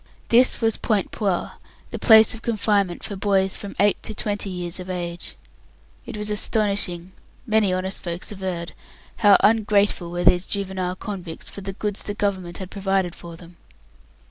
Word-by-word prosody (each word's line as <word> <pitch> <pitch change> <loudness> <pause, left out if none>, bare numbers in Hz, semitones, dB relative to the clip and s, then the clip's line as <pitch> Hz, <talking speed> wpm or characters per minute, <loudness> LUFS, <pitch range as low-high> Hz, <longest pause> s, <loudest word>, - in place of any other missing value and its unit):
This 245 +2 +4
was 225 -1 +2
Point 210 -4 0
Puer, 195 -5 -1 0.4
the - - -5
place 220 -2 +7
of 225 - -8
confinement 205 -5 0
for 200 - -5
boys 195 -1 +1
from 200 -1 -6
eight 205 0 +3
to 220 - -5
twenty 205 -1 -2
years 180 -1 -4
of 180 0 -8
age. 175 -1 -5 0.7
It - - -6
was 210 0 -1
astonishing 200 -4 0 0.3
many 215 -4 +2
honest 185 +1 -2
folks 170 +2 -3
averred 185 -4 -4 0.4
how 205 -3 +6
ungrateful 205 -4 +2
were 175 +1 -3
these 180 +1 +4
juvenile 190 -2 -2
convicts 185 -5 -7
for 200 - -9
the 195 0 -5
goods 205 0 -3
the 205 - -5
Government 190 -4 -2
had 190 -1 -8
provided 195 -3 0
for 170 -1 -10
them. 170 +1 -15
195 Hz, 165 wpm, -23 LUFS, 180-210 Hz, 0.7 s, place